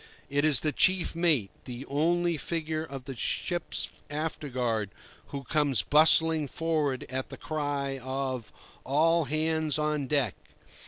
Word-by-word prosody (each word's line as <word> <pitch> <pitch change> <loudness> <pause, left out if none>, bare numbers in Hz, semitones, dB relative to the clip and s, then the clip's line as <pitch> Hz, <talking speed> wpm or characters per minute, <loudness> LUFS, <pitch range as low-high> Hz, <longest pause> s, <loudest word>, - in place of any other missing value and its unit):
It 145 +1 +2
is 150 -4 +4
the 155 - +1
chief 185 +2 +3
mate, 155 - +2
the 125 +2 -6
only 170 +4 +1
figure 160 0 -2
of 135 -4 -8
the 135 -1 -6
ship's 175 +7 -1 0.2
afterguard, 130 -8 -2 0.4
who 140 -1 -6
comes 140 - +1
bustling 155 - +4
forward 150 -3 -1
at 130 +1 -4
the - - -8
cry 145 -3 -2
of 130 -2 -3 0.3
"All 160 +4 +3
hands 155 +1 +1
on 150 -2 0
deck!" 135 -7 +1
150 Hz, 130 wpm, -29 LUFS, 135-160 Hz, 0.4 s, is